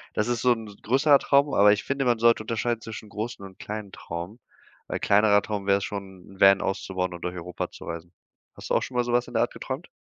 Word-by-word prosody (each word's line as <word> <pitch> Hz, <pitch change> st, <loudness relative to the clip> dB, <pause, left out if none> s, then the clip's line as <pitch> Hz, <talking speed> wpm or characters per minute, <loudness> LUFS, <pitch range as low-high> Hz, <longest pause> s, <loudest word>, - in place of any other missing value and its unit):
Das 105 Hz, -, 0 dB
ist 120 Hz, -1 st, -1 dB
so 125 Hz, -1 st, +5 dB
'n 115 Hz, -1 st, -7 dB, 0.2 s
größerer 140 Hz, +4 st, +4 dB
Traum, 140 Hz, 0 st, +3 dB
aber 105 Hz, +1 st, +6 dB
ich 105 Hz, -, -2 dB
finde, 135 Hz, 0 st, -1 dB
man 120 Hz, -2 st, +3 dB
sollte 115 Hz, -1 st, +4 dB
unterscheiden 115 Hz, +1 st, -2 dB
zwischen 110 Hz, -2 st, -8 dB
großen 105 Hz, -1 st, -5 dB
und 95 Hz, -1 st, -13 dB
kleinen 105 Hz, -2 st, -6 dB
Traum, 90 Hz, +8 st, -7 dB, 0.5 s
weil -, -, -2 dB
kleinerer 105 Hz, 0 st, +4 dB
Traum 100 Hz, -2 st, -4 dB
wär's 100 Hz, 0 st, +3 dB
schon, 95 Hz, -3 st, -7 dB
'n -, -, -16 dB
Van 95 Hz, 0 st, +7 dB
auszubauen 95 Hz, -2 st, -2 dB
und 85 Hz, -, -9 dB
durch 90 Hz, 0 st, -3 dB
Europa 90 Hz, 0 st, -5 dB
zu -, -, -12 dB
reisen. 85 Hz, +1 st, -7 dB, 0.4 s
Hast -, -, -9 dB
du -, -, +3 dB
auch -, -, +3 dB
schon 125 Hz, -, -5 dB
mal 120 Hz, -, +3 dB
so 120 Hz, 0 st, -3 dB
was 120 Hz, 0 st, +2 dB
in -, -, -11 dB
der -, -, +4 dB
Art -, -, -3 dB
geträumt? -, -, -6 dB
105 Hz, 245 wpm, -26 LUFS, 95-120 Hz, 0.5 s, Van